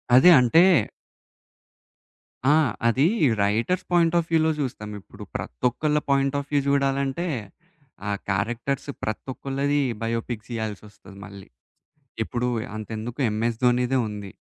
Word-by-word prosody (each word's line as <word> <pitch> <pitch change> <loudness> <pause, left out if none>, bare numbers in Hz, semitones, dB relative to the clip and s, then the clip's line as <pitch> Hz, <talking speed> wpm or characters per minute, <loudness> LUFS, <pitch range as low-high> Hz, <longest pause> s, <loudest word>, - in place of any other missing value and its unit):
అదే 130 +8 +8
అంటే 125 +8 +5 1.9
ఆ! - - +6 0.3
అది 130 +5 +3 0.4
రైటర్స్ 115 - 0
పాయింట్ 170 -1 +3
ఆఫ్ 170 - +1
వ్యూలో 160 -1 +3
చూస్తాం. 120 -6 -4
ఇప్పుడు - - -12
ప్రతి - - -5
ఒక్కళ్ళ 150 +4 0
పాయింట్ 140 0 +2
ఆఫ్ 140 - -7
వ్యూ 145 - +3
చూడాలంటే, 140 +3 0 0.8
ఆ - - 0 0.2
క్యారెక్టర్స్ 120 +8 -2
ప్రతి 110 - -3
ఒక్కళ్ళది 140 +2 -1 0.2
బయోపిక్స్ 115 0 -3
ఇయ్యాల్సొస్తది. 105 -2 -7
మళ్ళీ 100 -1 -12 0.8
ఇప్పుడు 125 +2 -2 0.3
అంతెందుకు 110 +4 -6
'ఎంఎస్ 110 +2 -1
ధోనిదే' 125 +1 +2
ఉంది. 100 -2 -7
125 Hz, 115 wpm, -24 LUFS, 110-140 Hz, 1.9 s, అదే